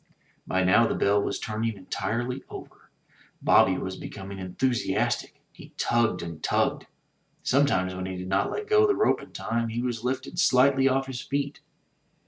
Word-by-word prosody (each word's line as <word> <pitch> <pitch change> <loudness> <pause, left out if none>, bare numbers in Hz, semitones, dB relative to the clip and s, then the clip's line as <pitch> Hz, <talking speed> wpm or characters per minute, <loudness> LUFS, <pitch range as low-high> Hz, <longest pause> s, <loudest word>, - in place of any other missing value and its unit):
By 95 0 +1
now 95 +6 +5
the - - -1
bell 100 +1 +2
was 100 - -2
turning 110 0 -3
entirely 120 +6 -3
over. - - -11 0.5
Bobby 95 -1 +4
was 95 0 -4
becoming 95 -1 -8
enthus 100 +4 -1
iastic. 95 - 0 0.2
He - - -15
tugged 120 -6 +1
and 85 -2 -7
tugged. - - 0 0.6
Sometimes 125 -10 +2
when 95 0 -4
he 95 -1 -5
did 90 0 -6
not 95 +1 +1
let 425 - -4
go 425 0 +5
the 405 - +2
rope 425 - +2
in - - -13
time, 115 +1 -2
he 115 +2 -3
was 120 -2 -3
lifted 130 +7 -3
slightly 135 -4 +4
off 135 +1 +1
his 130 -2 -5
feet. 140 +1 -3
115 Hz, 170 wpm, -26 LUFS, 95-130 Hz, 0.6 s, now